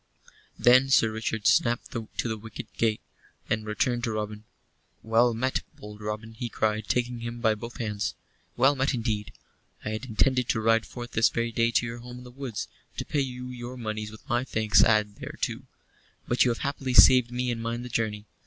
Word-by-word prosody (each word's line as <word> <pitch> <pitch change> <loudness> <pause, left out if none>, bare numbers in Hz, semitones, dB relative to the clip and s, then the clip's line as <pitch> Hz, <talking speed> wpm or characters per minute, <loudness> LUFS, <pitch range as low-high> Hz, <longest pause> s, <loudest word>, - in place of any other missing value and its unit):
Then 130 +2 +6
Sir 115 -4 +4
Richard 110 -1 -3
snapped 120 +2 +3
to 115 -3 -5 0.2
the 110 - -1
wicket 110 -1 -9
gate, 110 -2 0 0.5
and 110 0 0
returned 120 +3 0
to 115 - -1
Robin. 105 0 -4 0.6
"Well 115 +1 +3
met, 130 +3 0
bold 105 0 -11
Robin," 105 +1 -5
he 120 +1 -5
cried, 110 -1 -1
taking 125 -1 0
him 115 +1 -5
by 110 -2 +3
both 115 +3 -8
hands. 105 -3 -2 0.4
"Well 135 +4 +5
met, 135 +1 +1
indeed. 110 -3 -2 0.5
I - - -1
had 110 +4 -4
intended 125 +1 +1
to - - +2
ride 115 0 +2
forth 120 -1 -8
this 110 0 +4
very 115 0 -1
day 115 +1 +2
to 120 - +2
your 115 0 -5
home 125 +1 -9
in 125 - -10
the 125 - -11
woods, 125 -4 -5 0.3
to - - -3
pay 145 - 0
you 125 -1 -4
your 125 0 -7
moneys 110 -2 -4
with 110 0 -14
my 120 +1 +1
thanks 110 -4 +3
added 105 -2 +2
thereto; - - -4 0.6
but 120 -1 +4
you - - +3
have 120 - -2
happily 135 -2 -2
saved 125 -2 +8
me 125 0 -1
and 115 -1 -3
mine 115 +1 -3
the - - -6
journey. 110 -3 -2
115 Hz, 200 wpm, -27 LUFS, 110-125 Hz, 0.6 s, saved